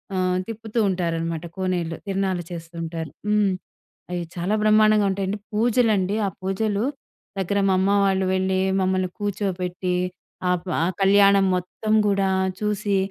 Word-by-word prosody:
ఆహ్, 185 -1 +1
తిప్పుతూ 225 +1 -4
ఉంటారనమాట 165 -2 -2
కోనేట్లో. 180 -3 -1
తిరనాలు 190 -2 -1
చేస్తుంటారు. 165 -2 -6 0.2
హ్మ్. 210 -2 +3 0.6
అవి 175 -1 -2
చాలా 180 +4 -1
బ్రహ్మాండంగా 215 -1 +5
ఉంటాయండి. 195 +1 -2
పూజలండి. 215 -3 +2
ఆ - - 0
పూజలు 200 +3 0 0.5
దగ్గర 200 +2 0
మా 190 - +3
అమ్మ 190 +1 +2 0.2
వాళ్ళు 190 -1 +2
వెళ్ళి 190 0 +1 0.2
మమ్మల్ని 185 0 +1
కూర్చోపెట్టి 185 -3 -2 0.6
ఆప్ 180 0 -2 0.2
ఆ - - +3 0.2
కళ్యాణం 200 0 +5
మొత్తం 180 +4 -2
గూడా 195 -1 +2 0.3
చూసి, 210 -1 0
190 Hz, 125 wpm, -23 LUFS, 180-205 Hz, 0.6 s, బ్రహ్మాండంగా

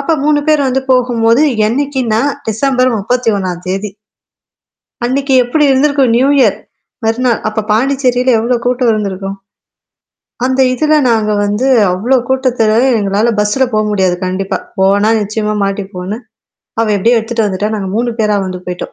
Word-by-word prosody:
அப்ப 315 +3 0
3 295 -1 +2
பேர் 295 -3 +3
வந்து 265 +1 -1
போகும்போது 240 0 +2 0.3
என்னைக்கின்னா 255 -3 -1 0.3
டிசம்பர் 255 +3 +1
31ம் 200 -6 -1
தேதி 195 +3 -3 1.2
அன்னக்கி 270 +2 -1
எப்பிடி 295 +5 +1
இருந்திருக்கும்? 275 -2 +2
நியூ 265 +2 +3
இயர் - - +3 0.5
மறுநாள் 235 +1 0
அப்ப 215 0 -2
பாண்டிச்சேரியில 255 +1 +1
எவ்ளோ 240 +2 0
கூட்டம் 250 0 +1
இருந்திருக்கும்? 195 -2 -3 1.1
அந்த 260 +1 0
இதுல 310 +4 +1 0.2
நாங்க 215 -2 +1
வந்து 210 +6 -1 0.3
அவ்ளோ 235 +9 +1
கூட்டத்துல 250 -5 +1 0.2
எங்களால 205 +3 0
பஸ்ல 210 +6 +1
போ 215 - +1
முடியாது 190 -3 +1
கண்டிப்பா. 190 +1 -2 0.2
போனா 200 +2 +3
நிச்சயமா 210 +1 -2
மாட்டிப்போன்னு, 195 0 -4 0.6
அவ 225 - +2
எப்பிடியே 230 +5 +2
எடுத்துட்டு 225 0 -1
வந்துட்டா, 205 +1 -2
நாங்க 195 -3 -3
3 240 +1 -1
பேரா 210 -1 +1
வந்து 185 -1 -6
போயிட்டோம். 180 0 -6
225 Hz, 135 wpm, -13 LUFS, 205-255 Hz, 1.2 s, பேர்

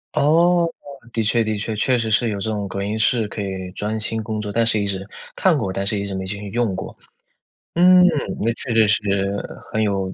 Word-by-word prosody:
哦， 170 +3 +4 0.4
的 115 - -1
确 115 +2 +2
的 110 -1 -2
确， 110 +1 -3
确 125 +4 +2
实 115 -1 -1
是 115 +2 +2
有 100 -2 -3
这 110 +3 -2
种 105 -2 -2
隔 100 - -4
音 105 +2 -2
室 110 0 +2
可 105 - -5
以 95 -2 -4
专 110 +1 -2
心 110 +1 -2
工 110 0 -3
作， 105 -1 -4
但 115 +2 +2
是 115 -1 +2
一 100 - -1
直 95 0 -3 0.3
看 185 -5 +3
过， 95 -8 -2
但 100 +1 -2
是 100 0 0
一 100 - -3
直 100 - -4
没 95 0 -4
进 100 +2 -5
去 105 -1 -7
用 115 -3 0
过。 - - -6 0.8
嗯， 180 +1 +7 0.3
那 115 +2 +1
确 115 +1 -5
确 110 -2 +5
实 105 +1 +2
实 100 0 0 0.4
很 110 0 +1
有 95 -2 -1
110 Hz, 255 characters per minute, -21 LUFS, 100-115 Hz, 0.8 s, 嗯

